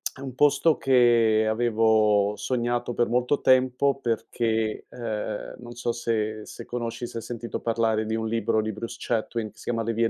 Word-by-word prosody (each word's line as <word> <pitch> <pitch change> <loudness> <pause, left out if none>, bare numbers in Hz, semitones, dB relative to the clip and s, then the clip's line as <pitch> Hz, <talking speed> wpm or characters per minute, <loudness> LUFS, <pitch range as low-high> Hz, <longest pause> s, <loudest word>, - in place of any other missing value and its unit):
è 130 - -12
un 135 -2 -6
posto 145 +4 +3
che 120 -4 +4
avevo 110 -3 +3
sognato 120 -1 -1
per 120 - +1
molto 125 +4 +1
tempo 130 +2 +3
perché, 115 -2 -1
ehm, 110 -3 -5
non 120 -1 -10
so 120 0 -2
se 110 -2 -2
se - - -9
conosci, 120 0 -4
se 115 - -6
sentito 120 0 -5
parlare 115 -1 0
di 110 +1 -2
un 110 0 -2
libro 110 -1 +1
di 110 0 -3
Bruce 115 +2 -6
Chatwin 115 -1 -2
che - - -32
si - - -12
chiama 115 -1 -1
"Le 115 +1 -1
vie 115 0 +2
115 Hz, 180 wpm, -25 LUFS, 110-120 Hz, -, che